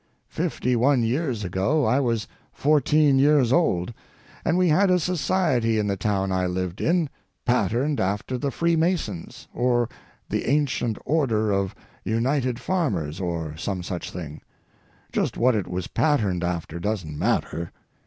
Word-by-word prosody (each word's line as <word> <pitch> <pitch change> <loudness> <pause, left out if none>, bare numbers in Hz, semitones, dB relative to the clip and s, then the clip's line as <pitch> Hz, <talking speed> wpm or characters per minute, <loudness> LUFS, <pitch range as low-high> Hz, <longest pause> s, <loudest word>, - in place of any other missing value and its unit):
Fifty 125 0 -1
one 125 +1 +3
years 125 -2 -1
ago 95 - +1
I 125 +5 +3
was 115 -5 0 0.2
fourteen 150 -1 +3
years 140 -3 +4
old, 105 - +1 0.5
and 165 - +1
we 180 -1 +3
had 190 +6 +4
a 180 - +5
society 155 -9 +1
in 105 - +1
the 100 -1 0
town 95 -1 -1
I 95 -1 +1
lived 90 0 -3
in, 170 -1 +2 0.4
patterned 125 +5 +1
after 105 +6 -1
the 140 - -1
Freemasons, 165 - -1
or 120 -1 +1 0.4
the - - -2
Ancient 130 -6 +1
Order 115 -9 +1
of 100 -1 0 0.3
United 125 +4 0
Farmers, 95 - -1
or 85 -4 -3
some 95 +1 -3
such 90 0 -4
thing—just 80 -4 -7
what 125 +2 +4
it 100 -5 -1
was 90 0 -3
patterned 105 - +1
after 85 -1 -3
doesn't 90 -6 -3
matter. 85 +3 -1
115 Hz, 140 wpm, -24 LUFS, 95-145 Hz, 0.5 s, a